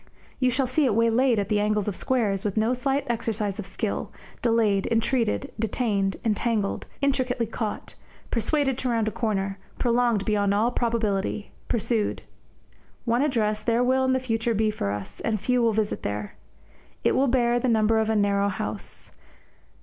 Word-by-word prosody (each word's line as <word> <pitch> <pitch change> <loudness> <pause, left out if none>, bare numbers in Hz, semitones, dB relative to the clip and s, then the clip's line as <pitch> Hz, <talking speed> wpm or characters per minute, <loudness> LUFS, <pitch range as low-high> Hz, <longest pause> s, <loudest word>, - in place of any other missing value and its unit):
You 255 -1 +3
shall 260 +2 +1
see 265 +4 +1
it 230 -6 +2
waylaid 230 +2 +3
at 200 -2 0
the 210 0 +1
angles 210 -1 +1
of 205 - -1
squares, 210 -6 0
with 210 -1 -2
no 220 +3 +3
slight 270 +2 0
exercise 220 -3 -2
of 200 - -2
skill, 200 +2 -3 0.3
delayed, 225 -5 +2
entreated, 230 +3 0
detained, 205 -3 0
entangled, 215 -1 0 0.2
intricately 260 -3 +1
caught, 220 -1 -4 0.4
persuaded 270 +3 +1
to 255 - -1
round 225 -2 +1
a - - 0
corner, 200 -3 -2 0.2
prolonged 235 -4 +2
beyond 205 -2 +2
all 225 +4 +2
probability, 215 -4 -1 0.2
pursued. 225 -1 0 0.8
One 235 +1 +2
address 215 -7 +1
there 230 +2 +2
will 260 +1 +3
in 260 0 +2
the 260 - +2
future 230 -2 -1
be 215 +1 +2
for 155 - -3
us, 100 0 -5
and 215 -2 -1
few 250 +4 +1
will 230 -1 +3
visit 215 -1 -1
there. 105 0 -4 0.7
It - - +4
will 275 - +3
bear 240 -1 +2
the 255 - -1
number 220 0 +3
of 220 0 0
a 220 - +2
narrow 200 -1 +2
house. 105 - -5
225 Hz, 170 wpm, -25 LUFS, 205-245 Hz, 0.8 s, It